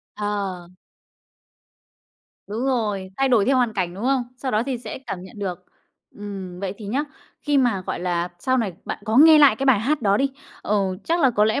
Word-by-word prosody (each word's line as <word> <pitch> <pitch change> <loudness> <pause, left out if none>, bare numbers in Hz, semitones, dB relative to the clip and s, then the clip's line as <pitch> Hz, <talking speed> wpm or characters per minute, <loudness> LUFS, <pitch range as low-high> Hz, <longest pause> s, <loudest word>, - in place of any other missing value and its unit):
Ờ. 200 -4 -3 1.8
Đúng 225 +5 -3
rồi, 210 -7 -1
thay 270 0 +2
đổi 225 -5 +4
theo 265 0 +3
hoàn 240 -3 +2
cảnh, 180 -3 -2
đúng 205 +5 -6
hông? 265 -1 +2
Sau 260 0 -3
đó 215 0 +1
thì 255 -3 -2
sẽ 245 - -7
cảm 180 -2 -5
nhận 190 +3 -12
được. 185 -4 -4 0.5
Ừm, 195 -3 -7
vậy 195 -1 -3
thì 210 - -8
nhá, 270 +8 -1 0.4
khi 290 -2 +1
mà, 230 -8 +1
gọi - - -3
là, 175 -1 -1
sau 260 +7 +1
này 205 -6 -1
bạn - - -4
có 220 +2 0
nghe 310 +2 +8
lại 275 -7 +6
cái 270 - -2
bài 250 -6 +5
hát 280 +2 0
đó 200 -1 +3
đi, 275 0 +1 0.3
ờ, 210 - 0 0.3
chắc 335 +1 +1
là 265 -3 +5
có 210 -2 +3
lẽ 220 +5 +1
215 Hz, 210 wpm, -23 LUFS, 195-265 Hz, 1.8 s, nghe